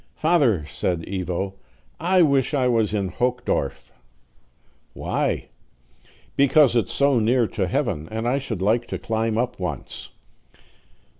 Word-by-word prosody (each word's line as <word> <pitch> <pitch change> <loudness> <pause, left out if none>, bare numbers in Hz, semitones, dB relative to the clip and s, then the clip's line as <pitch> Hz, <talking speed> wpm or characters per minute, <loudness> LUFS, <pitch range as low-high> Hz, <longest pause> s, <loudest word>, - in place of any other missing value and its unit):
"Father," 140 - +2
said 85 +2 -2
Ivo, 95 0 -3 0.5
"I 180 +2 +4
wish 140 -1 +2
I 130 -3 +2
was 115 -4 +2
in 100 -3 -1
Hochdorf." 125 - -2 1.0
"Why?" - - -2 0.9
"Because 140 -1 +5
it's 110 -6 +1
so 140 -3 +3
near 120 +2 +3
to 95 -3 -1
heaven, 90 - -1
and 110 +2 -3
I 135 +3 +1
should 115 -8 -4
like 115 +4 +2
to - - -4
climb 110 0 -1
up 125 0 -1
once." 90 -1 -5
115 Hz, 130 wpm, -23 LUFS, 95-135 Hz, 1.0 s, Because